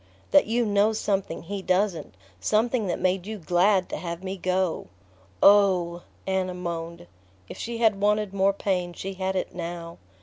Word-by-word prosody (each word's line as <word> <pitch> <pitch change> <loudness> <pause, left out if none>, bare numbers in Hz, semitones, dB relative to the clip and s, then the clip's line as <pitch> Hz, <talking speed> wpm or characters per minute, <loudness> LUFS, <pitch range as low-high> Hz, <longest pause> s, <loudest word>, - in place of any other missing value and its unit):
"That 290 - +6
you 235 +2 +1
know 205 +1 +3
something 195 -6 -2
he 200 +3 -5
doesn't... 185 - 0 0.2
something 220 - +1
that 175 - -2
made 185 0 0
you 220 0 -4
glad 180 +2 +2
to - - -4
have 170 +2 -6
me 190 0 -4
go." 185 -2 -1 0.6
"Oh 185 -4 +5
" - - -33
Anna 190 -1 -1
moaned. 170 - -5 0.4
If - - -9
she 235 0 -4
had 220 -4 +2
wanted 210 -1 +1
more 195 0 +3
pain 185 -3 -2
she 195 +2 -6
had 190 0 -2
it 185 - -2
now. 170 -1 -6
190 Hz, 170 wpm, -26 LUFS, 175-205 Hz, 0.6 s, That